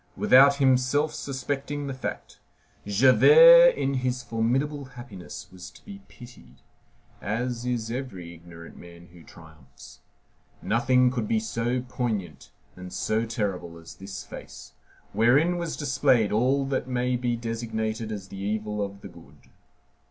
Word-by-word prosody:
Without 140 +2 +6
himself 135 +2 +2
suspecting 140 +1 -4
the 135 - -4
fact, 130 - -7 0.5
Javert 480 - +7
in 135 - -1
his 125 -1 -2
formidable 130 +6 -1
happiness 120 -8 -10
was 90 -1 -11
to 90 - -20
be 200 -1 -10
pitied, 125 -1 -16 0.6
as 120 +3 -3
is 115 -2 -2
every 100 -10 -6
ignorant 85 0 -13
man 85 0 -14
who 85 - -15
triumphs. 80 -7 -16 0.6
Nothing 125 +2 +2
could 120 -4 -3
be 110 - +1
so 120 +3 -2
poignant 115 -7 -4 0.3
and 90 0 -10
so 110 +1 -1
terrible 95 -7 -4
as 80 0 -12
this 95 -2 -9
face, - - -12 0.4
wherein 135 - +3
was 170 -2 -4
displayed 130 -6 +1
all 130 +5 +1
that 135 -2 -2
may 125 0 -1
be 120 -1 -1
designated 115 -1 -4
as 100 -3 -7
the 95 - -9
evil 105 +1 -3
of 100 0 -5
the - - -9
good. 70 +1 -18
120 Hz, 135 wpm, -25 LUFS, 100-130 Hz, 0.6 s, Javert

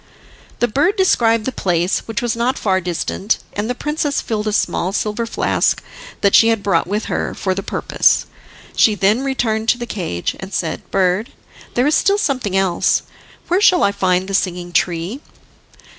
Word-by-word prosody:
The 240 - +4
bird 290 - +1
described 230 - +2
the 260 - -1
place, 175 -4 0
which 225 +1 -3
was 235 -2 0
not 240 +3 0
far 190 -2 +1
distant, 180 +4 -1 0.2
and 210 +3 -3
the 250 - -1
princess 295 +1 -1
filled 215 -1 -3
a - - +1
small 190 -2 0
silver 215 +2 -1
flask - - +1 0.4
that 200 -1 +3
she 225 - +7
had 225 -3 +1
brought 175 -5 +1
with 210 +3 -2
her - - -2
for 190 - -1
the 195 - -3
purpose. - - +1 0.5
She 215 - +4
then 205 +6 +2
returned 225 -5 -1
to - - +3
the 240 - -5
cage, 170 - -3
and 190 +1 -8
said: 165 - -3
"Bird, 190 +4 +1 0.4
there 245 - +2
is 295 - +2
still 400 +5 +3
something 255 - -1
else, 190 -3 +1 0.4
where 360 +3 +2
shall 365 -4 +5
I 200 - +3
find 185 -2 0
the 195 - -5
Singing 180 -2 -1
Tree?" 175 - -1
210 Hz, 180 wpm, -18 LUFS, 190-245 Hz, 0.5 s, she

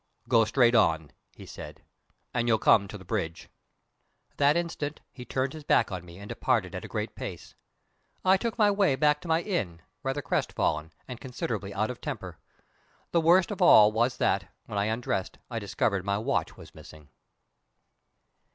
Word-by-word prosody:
"Go 115 -1 +4
straight 120 +2 +3
on," 80 -9 +2 0.2
he - - -11
said, - - -10 0.5
"and 120 -1 0
you'll 115 -1 +4
come 100 -2 +4
to 105 - -8
the 95 - -14
bridge." 85 -5 -3 0.9
That 145 +3 +4
instant 160 -4 -3
he 125 -2 -10
turned 130 +2 -2
his 155 -1 -9
back 115 -6 +2
on 90 -2 -5
me 85 0 -13
and 100 +1 -10
departed - - 0
at - - -5
a - - -7
great - - -4
pace. - - -8 0.7
I 190 +1 +6
took 230 +4 -2
my 210 -3 +4
way 200 -8 +2
back 150 +2 +2
to 180 - -9
my 165 +1 +2
inn, 100 - -2 0.2
rather 135 +2 -2
crestfallen, 75 -7 -1 0.2
and 125 -2 -8
considerably 115 -6 -4
out 110 +4 -1
of 125 - -10
temper. - - -6 0.7
The 170 - +3
worst 175 +5 +4
of 205 - -5
all 110 -12 +8
was 120 +3 +1
that, - - 0
when 100 - -3
I 100 - +1
undressed, 110 -3 -2
I 115 - -2
discovered 100 -1 -1
my 100 0 0
watch 110 -6 -1
was - - -13
missing. 75 -2 -14
120 Hz, 180 wpm, -28 LUFS, 100-150 Hz, 0.9 s, all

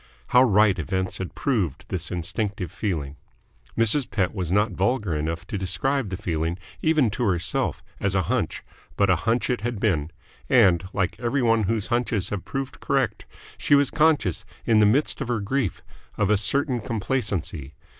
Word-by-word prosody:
How 125 - +6
right 105 -5 +4
events 95 +5 -2
had 95 - -5
proved 105 - -1
this 90 -2 -3
instinctive 95 +2 -3
feeling. 75 -9 -3 0.6
Mrs. 115 +4 +3
Pett 95 -3 0
was 90 -5 -3
not 105 +3 +2
vulgar 100 -1 0
enough 80 +4 -3
to 100 +2 -4
describe 100 +7 0
the 95 - -4
feeling, 85 -3 -2 0.2
even 155 -8 +3
to 120 - -2
herself, 90 -5 0 0.2
as 100 -1 0
a 95 - +2
hunch, - - -2 0.3
but 100 -2 +4
a - - +5
hunch 120 +2 +1
it 125 - -1
had 120 -2 -3
been; 80 -8 0 0.4
and, 95 -8 +5
like 95 -3 -1
every 125 +2 0
one 115 -2 +3
whose 110 0 0
hunches 115 -5 0
have 100 -3 -4
proved 135 -1 -5
correct, - - -1 0.3
she 145 - +4
was 140 -1 +3
conscious 145 - +2 0.2
in 110 -2 +4
the 105 - +6
midst 140 +7 +2
of 135 - -2
her 120 -2 0
grief 110 +1 -2 0.3
of 105 0 +2
a - - +5
certain 130 +5 +1
complacency. 100 - -3
105 Hz, 175 wpm, -24 LUFS, 90-120 Hz, 0.6 s, How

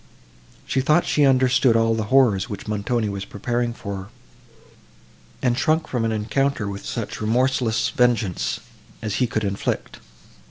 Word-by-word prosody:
She 135 - 0
thought 155 +5 +3
she 145 - +3
understood 130 -2 +4
all 115 0 +3
the 110 -1 -1
horrors, 120 -4 +3
which 100 -1 -7
Montoni 105 +2 -1
was 100 -1 -4
preparing 120 +4 -2
for 100 -4 -6
her, 95 0 -8 1.4
and 125 -2 +2
shrunk 155 +4 +1
from 120 -3 -1
an 115 - 0
encounter 110 +2 0
with 100 0 -6
such - - -5
remorseless 115 0 +1
vengeance, 115 -6 0 0.4
as 105 -1 -2
he 125 - +2
could 110 -1 -2
inflict. 100 -1 -3
115 Hz, 150 wpm, -23 LUFS, 105-130 Hz, 1.4 s, understood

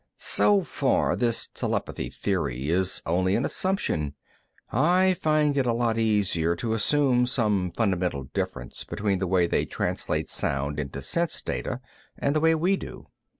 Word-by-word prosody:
"So 205 -2 +4
far, 140 -5 +1
this 120 -2 0
telepathy - - -3
theory 75 -8 -2
is 95 +2 +1
only 95 +3 +1
an 120 - 0
assumption. 80 - -1 0.6
I 185 +3 +3
find 155 -3 +1
it 135 -3 +1
a 120 - +2
lot 115 -1 0
easier 100 -7 +1
to 110 +6 -2
assume 125 +1 +3
some 105 -7 +1
fundamental 90 - -1
difference 60 -1 -5
between 100 -2 -1
the 95 - -1
way 90 -1 +3
they - - 0
translate - - -2
sound 70 +2 -2
into 70 -1 -5
sense 170 - -1
data 130 -1 -3 0.4
and 140 +2 0
the - - +3
way 160 +1 +4
we 180 +5 +2
do. - - -9
110 Hz, 150 wpm, -26 LUFS, 85-145 Hz, 0.6 s, So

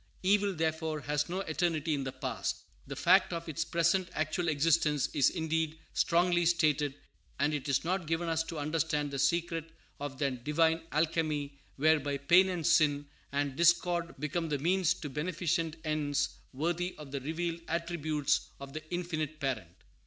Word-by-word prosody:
Evil, 200 0 +3
therefore, 160 -1 -1
has 150 +1 -1
no 185 +2 -2
eternity 160 -2 0
in 140 -2 -1
the 130 - -3
past. - - -3 0.2
The - - -5
fact - - +4
of 170 0 -4
its 155 - -1
present 170 +2 +1
actual 155 +3 -1
existence 150 -2 +2
is 140 -3 +4
indeed 160 -2 -1 0.2
strongly 175 0 +3
stated; 150 -4 +2 0.4
and 145 +3 +1
it 145 -1 -3
is 135 - +2
not 185 -1 -1
given 165 +1 -1
us 165 -1 +1
to 165 - -6
understand 150 -1 -1
the 140 - -3
secret 165 +3 0 0.3
of 145 -2 -5
that 130 -4 -2
divine 160 +3 +2
alchemy 150 -3 0 0.2
whereby 145 -1 +2
pain, 175 +7 +5
and 175 -4 -3
sin, 145 -3 +4 0.3
and 140 -1 -1
discord 170 +1 +2
become 155 +4 -2
the 145 - 0
means 180 +3 +2
to 175 - -6
beneficent 165 +2 -1
ends 150 -2 0 0.2
worthy 175 +6 -2
of 150 -3 -10
the 140 -1 -3
revealed 165 +4 -3
attributes 155 -3 0
of 140 0 -9
the 155 - -4
Infinite 160 -4 -3
Parent. 110 - -4
160 Hz, 160 wpm, -31 LUFS, 145-170 Hz, 0.4 s, pain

